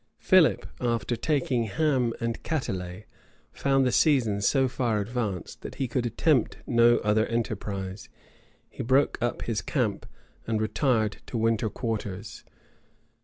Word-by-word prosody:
Philip, - - +4
after 120 -1 -1
taking 130 -3 0
Ham 130 0 +1
and 115 0 -3
Catelet, 95 - -4 0.5
found 135 -1 +2
the 125 - +2
season 120 -11 +3
so 135 +6 +3
far 120 -4 0
advanced, 105 -4 -4
that - - -8
he 135 - -2
could 120 0 -1
attempt 130 +2 +1
no 120 -1 +5
other 105 +1 +2
enterprise: 100 -4 -4 0.6
he - - -8
broke 130 +4 +2
up 120 0 -1
his 115 -3 -2
camp, 110 -8 -1 0.4
and 110 -1 0
retired 110 -1 +1
to 120 - -4
winter 115 -1 +1
quarters. 105 -3 -5
115 Hz, 130 wpm, -27 LUFS, 105-130 Hz, 0.6 s, no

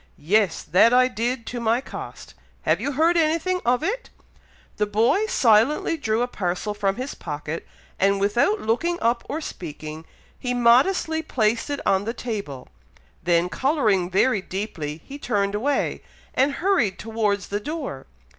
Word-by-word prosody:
"Yes! 195 +2 +1
that 225 +6 +4
I 255 0 +6
did, 240 0 -2
to 245 - -5
my 230 +1 +2
cost! 265 - -9 0.3
Have - - +2
you 285 - -2
heard 330 +5 +3
anything 335 +3 +1
of 245 +4 +2
it?" - - -2 0.7
The 210 - +1
boy 230 - +2
silently 260 - +3
drew 230 -6 0
a - - -1
parcel 190 -1 -2
from 200 -2 0
his 255 +3 -5
pocket, 150 +1 -6 0.3
and 200 +1 +3
without 240 - +2
looking 335 +11 0
up 235 +1 +1
or 305 +4 -3
speaking, 155 - -7 0.3
he 250 -1 -2
modestly 275 +7 +3
placed 230 -6 0
it 285 - -3
on 195 0 +2
the 230 +2 -3
table, 200 - -5 0.5
then 170 0 +2
colouring 215 - +1
very 200 +3 +2
deeply, 165 -6 -5
he 280 +1 -9
turned 200 -6 0
away, 270 +8 0 0.3
and 275 +2 +2
hurried 335 - +1
towards 210 -3 -1
the 205 - -1
door. 280 - -5
230 Hz, 155 wpm, -23 LUFS, 200-280 Hz, 0.7 s, I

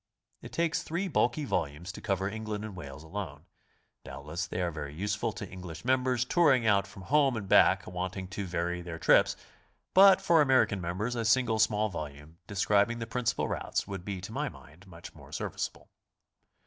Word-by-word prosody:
It - - -10
takes 165 -1 0
three 175 +5 -2
bulky 145 -3 +1
volumes 85 - -2
to - - -10
cover 95 -2 -1
England 110 0 -4
and 105 -3 -8
Wales 70 -3 -9
alone. 80 -3 -6 0.6
Doubtless 80 +5 -5
they 90 - -4
are 90 -1 0
very 75 -2 -6
useful 105 +5 -1
to 100 - -7
English 90 -2 -9
members 125 -1 +2
touring 135 -6 +4
out 100 -2 +3
from 100 -1 -12
home 140 0 +3
and 100 -3 -5
back, - - +5
wanting 90 +1 -4
to 95 +1 -4
vary 90 0 -2
their 85 -1 -6
trips, - - +4 0.6
but 195 +1 +8
for 165 -2 +4
American 130 -8 +3
members 95 +8 -2
a 115 - -1
single 110 0 +2
small 110 0 +2
volume 75 -1 -8
de 100 - -8
scribing 100 +4 +2
the 115 - -4
principal 115 +1 -1
routes - - -2
would 95 -3 -6
be 100 -1 -4
to 95 - -7
my 145 +5 -2
mind 90 +5 -16
much 85 -2 -11
more - - -15
serviceable. - - -5
100 Hz, 185 wpm, -30 LUFS, 90-120 Hz, 0.6 s, but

